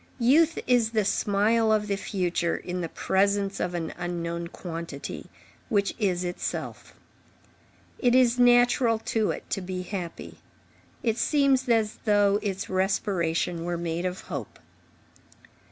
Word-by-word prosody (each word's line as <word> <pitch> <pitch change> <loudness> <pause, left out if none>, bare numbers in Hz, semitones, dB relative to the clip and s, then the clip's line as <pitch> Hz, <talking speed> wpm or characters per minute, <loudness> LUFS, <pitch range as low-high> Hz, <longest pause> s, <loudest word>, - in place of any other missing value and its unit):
Youth 300 +7 +4
is 240 -3 +2
the 215 -3 +2
smile 215 +3 +2
of 215 -1 +2
the 200 -1 -1
future 175 -4 -1
in 180 0 -5
the 165 - -3
presence 200 +2 0
of 180 0 -2
an 165 -2 -3
unknown 170 -1 -3
quantity, 165 -4 -7 0.4
which 200 -4 +1
is 185 -4 0
itself. 175 0 -5 1.0
It 245 -1 +3
is 250 -1 +4
natural 245 -1 +5 0.2
to 220 -2 +2
it - - -4
to 195 - -1
be 185 0 -4
happy. 180 -2 -6 0.6
It 225 0 0
seems 275 -3 +2
as 220 -2 +1
though 205 -1 +3
its 195 -2 -3
respiration 185 -3 0
were 175 0 -2
made 170 +1 -3
of 180 +1 -5
hope. 140 - -7
200 Hz, 135 wpm, -26 LUFS, 175-225 Hz, 1.0 s, natural